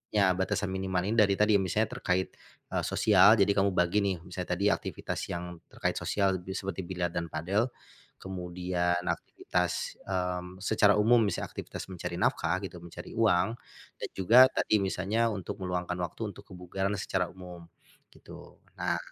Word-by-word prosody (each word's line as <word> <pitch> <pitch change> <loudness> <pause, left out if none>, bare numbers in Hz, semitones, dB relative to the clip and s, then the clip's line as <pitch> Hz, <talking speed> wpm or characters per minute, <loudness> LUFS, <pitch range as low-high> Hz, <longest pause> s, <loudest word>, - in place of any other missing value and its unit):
ya 100 -3 +5
batasan 95 +1 -1
minimal 95 -1 -1
ini 105 +3 0
dari 100 -2 +5
tadi. 105 0 +4
Misalnya 105 +4 0
terkait, 95 0 0 0.4
eee, - - 0
sosial 105 0 +6
jadi 100 -1 +4
kamu 100 -1 +2
bagi 90 +3 +3
nih 100 -2 0
misalnya 90 0 -4
tadi 100 +3 +2
aktivitas - - -3
yang 90 0 -5
terkait - - -2
sosial 95 -2 +1
be 95 +2 -6
seperti 95 -2 -4
biliar 90 -1 -2
dan 85 -1 -2
padel, 95 +10 0 0.5
kemudian 90 -1 -2
aktivitas, 90 -2 -2
mmm, 90 0 -3
secara 105 -1 +4
umum 115 +3 +5
bisa 100 - -2
aktivitas - - -7
mencari 90 -1 -5
nafkah 85 0 +1
gitu 90 -2 -7
mencari 85 - -9
uang, 110 -2 +2 0.4
dan - - -4
juga 120 +7 +8
tadi 110 - +2
misalnya 100 +5 0
untuk 95 -2 -6
meluangkan 90 -1 -2
waktu 85 -2 -4
untuk - - -12
kebugaran 95 +2 -3
secara 90 -1 -1
umum, 90 -2 -11 0.5
gitu. - - -13 0.2
Nah - - 0
95 Hz, 155 wpm, -29 LUFS, 90-100 Hz, 0.5 s, juga